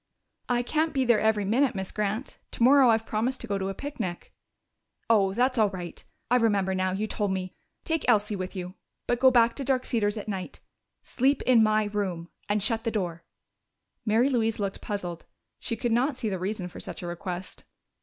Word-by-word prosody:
"I 245 0 +2
can't 315 +5 0
be 265 -1 +2
there 235 -3 +4
every 215 -2 +2
minute, 250 +6 +2
Miss 190 -1 -3
Grant. 210 +5 -3
Tomorrow 260 +1 +5
I've 225 0 +3
promised 235 +5 -1
to - - -3
go 200 - -2
on 195 - -1
a - - -3
picnic." 225 -11 -5 0.8
"Oh, 195 -3 +3
that's 250 +1 +2
all 215 -2 +4
right! 180 -3 -7 0.3
I 250 - +6
remember 205 -5 +2
now, 185 0 0
you 200 +3 -1
told 210 -1 -2
me. 185 -1 -3 0.3
Take 325 -2 -1
Elsie 210 -2 +3
with 185 +1 -5
you. 180 -1 -5 0.3
But 240 - 0
go 260 0 +7
back 235 -2 +4
to 280 - -3
Dark 260 -1 0
Cedars 210 -2 0
at 210 - -6
night. 190 -3 -5 0.4
Sleep 270 +3 +1
in 245 -3 +5
my 215 0 +3
room. 195 -5 -3 0.2
And 205 -1 +1
shut 225 +1 0
the 230 - 0
door!" 175 -6 -3 0.8
Mary 230 +4 +3
Louise 225 -4 +1
looked 200 -2 -3
puzzled; 175 -5 -5 0.3
she 230 - -2
could 235 +1 -2
not 255 +5 +2
see 230 -3 -2
the 190 -2 -3
reason 190 0 -3
for 180 - -10
such - - -6
a - - -4
request. 175 +1 -6
215 Hz, 200 wpm, -27 LUFS, 190-245 Hz, 0.8 s, go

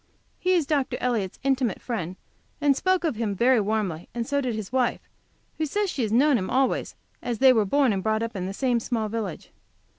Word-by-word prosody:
He 370 0 +2
is 340 -5 +2
Dr. 280 -3 0
Elliott's 225 -7 -1
intimate 265 -6 +1
friend, 185 -7 -4 0.4
and 290 -2 +3
spoke 370 +5 +1
of 310 -10 -1
him 215 -3 -1
very 245 +4 +4
warmly, 200 -6 -2
and 235 -1 -2
so 280 +2 0
did 250 -4 -2
his 215 -2 -6
wife, 255 -2 +1 0.6
who 310 - 0
says 405 +5 -1
she 270 - -3
has 220 -3 -1
known 265 +2 +4
him 185 - -4
always, 265 0 0 0.3
as 240 -2 -3
they 265 +1 +6
were 220 -3 +2
born 265 +2 +3
and 195 - -1
brought 220 +2 0
up 230 -1 -4
in 185 -1 -3
the - - -3
same 250 -1 +1
village. 220 -4 -3
240 Hz, 210 wpm, -25 LUFS, 215-275 Hz, 0.6 s, they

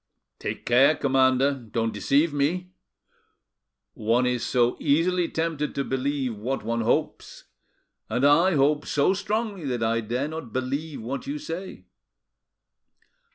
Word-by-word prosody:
"Take - - -5
care, 130 +6 +5
commander; 135 0 +3
don't 115 -3 -3
deceive 145 +3 +2
me. 175 +6 -1 1.2
One 115 +4 +1
is 125 -1 0
so 120 -1 +2
easily 170 +4 +2
tempted 160 -2 -2
to 140 - 0
believe 135 -2 -2
what 125 +5 -3
one 115 +1 -1
hopes, 110 - -1 0.7
and 125 +5 +1
I 165 +5 +5
hope 145 +2 +2
so 145 +6 +2
strongly 200 -2 -3
that 125 -4 -2
I 115 +1 +1
dare 120 +6 -2
not 160 -7 -7
believe 140 +2 -3
what 135 - -5
you 285 +2 -3
say. 185 - -7
140 Hz, 130 wpm, -25 LUFS, 125-160 Hz, 1.2 s, care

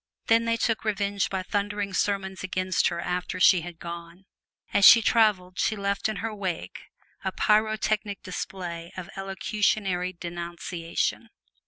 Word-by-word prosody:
Then 230 0 +4
they 230 0 +1
took 225 -1 0
revenge 200 -2 0
by 190 -1 -2
thundering 205 0 -2
sermons 190 0 -1
against 185 0 0
her 170 -1 -2
after 180 +1 -3
she 180 -1 +6
had 175 0 -8
gone. 170 +2 -9 0.5
As 200 - +3
she 230 - +11
traveled 210 -6 +2
she 220 - +1
left 200 +1 -1
in 215 - -2
her 225 - -3
wake 190 -5 -5 0.4
a - - -1
pyrotechnic 215 -1 +1
display 175 -2 -6
of 180 -2 -7
elocutionary 195 -1 -1
denunciation. 170 -1 -4
190 Hz, 140 wpm, -26 LUFS, 180-210 Hz, 0.5 s, she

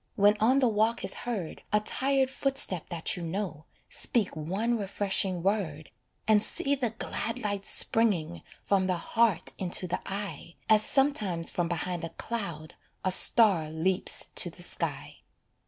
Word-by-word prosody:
When 205 +1 +4
on 245 +5 +3
the 265 -2 +3
walk 220 +1 +1
is - - -2
heard 215 -9 -5
A 210 - +4
tired 265 +4 0
footstep 270 - -2
that 170 -3 -1
you 180 - -7
know, 165 -3 -4 0.2
Speak 220 -8 0
one 195 +10 -1
refreshing 195 -3 -1
word, 180 -7 -2 0.4
And 215 -1 +5
see 275 +5 +1
the 260 -4 0
glad 230 +1 -4
light 205 -4 -3
springing 175 -8 +1 0.2
From 190 -2 +1
the 185 - +1
heart 225 +1 +1
into 180 0 -1
the 180 - -3
eye, 195 -4 -6
As 215 -1 +6
sometimes 215 - 0
from 175 -1 -1
behind 175 0 -3
a 165 - -4
cloud 170 -5 -6 0.3
A 185 - +2
star 185 -5 +5
leaps 180 +5 0
to - - +6
the - - -5
sky. - - -2
200 Hz, 155 wpm, -28 LUFS, 175-225 Hz, 0.4 s, As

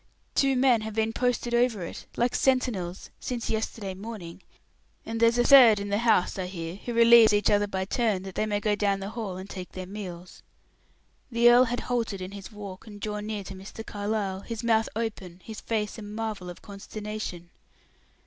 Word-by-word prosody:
"Two 270 -1 +3
men 250 -3 +4
have 215 -1 -6
been 225 0 0
posted 245 -1 0
over 240 -5 +2
it, - - -9
like 240 +1 +1
sentinels, 225 -9 0
since 245 -2 -3
yesterday 220 -3 -3
morning. 195 -3 -8 0.6
And 225 0 -4
there's 230 +1 +4
a 240 - +4
third 240 -6 +8
in 200 0 -4
the 200 +1 +1
house, 220 -5 +2
I 185 - -2
hear, 170 -1 -6
who 240 - -6
relieves 230 -1 +7
each 205 0 +3
other 205 0 +3
by 190 -1 -2
turn, 210 -3 0
that 190 -1 -7
they 215 - -1
may 205 -1 0
go 210 0 +1
down 205 -1 +1
in - - -7
the 195 - -4
hall 210 -6 -5
and 190 +1 -7
take 185 -2 -8
their 185 0 -6
meals." 180 -3 -8 0.9
The 235 +1 +6
earl 245 +1 +7
had 245 0 -2
halted 230 -5 -2
in 185 +1 -6
his 200 +2 -9
walk 205 -1 -9
and 205 -1 -10
drawn 210 0 -4
near 210 -2 -3
to 190 - -8
Mr. 195 +4 -9
Carlyle, 205 -2 -2
his 230 +3 -6
mouth 225 -1 +2
open, 200 -6 -4
his 220 -1 -8
face 215 -1 -2
a - - -7
marvel 210 -3 -5
of 175 - -10
consternation. 205 -3 -7
210 Hz, 200 wpm, -27 LUFS, 195-230 Hz, 0.9 s, third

